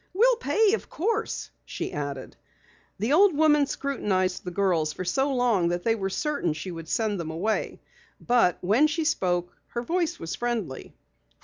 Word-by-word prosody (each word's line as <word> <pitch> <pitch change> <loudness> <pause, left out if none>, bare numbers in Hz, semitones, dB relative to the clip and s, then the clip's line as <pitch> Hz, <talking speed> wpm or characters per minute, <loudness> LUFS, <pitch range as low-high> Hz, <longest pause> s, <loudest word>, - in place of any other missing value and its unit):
"We'll 480 +4 +4
pay, 440 -3 +2
of 450 - -2
course," 445 +6 -2
she - - -5
added. 140 -2 -5 0.6
The 220 +8 0
old 365 -2 +5
woman 300 -2 +4
scrutinized 190 -11 -1
the 180 - -4
girls 175 -5 +1
for 185 - -5
so 270 +10 +1
long 240 -9 +2
that 175 +1 -1
they 225 - +3
were 195 -4 -2
certain 285 - -1
she 155 +4 -6
would 165 -1 -8
send 215 -4 0
them 165 -2 -4
away. 190 +7 -2 0.4
But 235 -8 +3
when 220 +12 +4
she 315 +1 -2
spoke, 180 - 0
her 235 - -4
voice 340 +3 -1
was 165 - -5
friendly. 230 - -4
220 Hz, 170 wpm, -26 LUFS, -, 0.6 s, old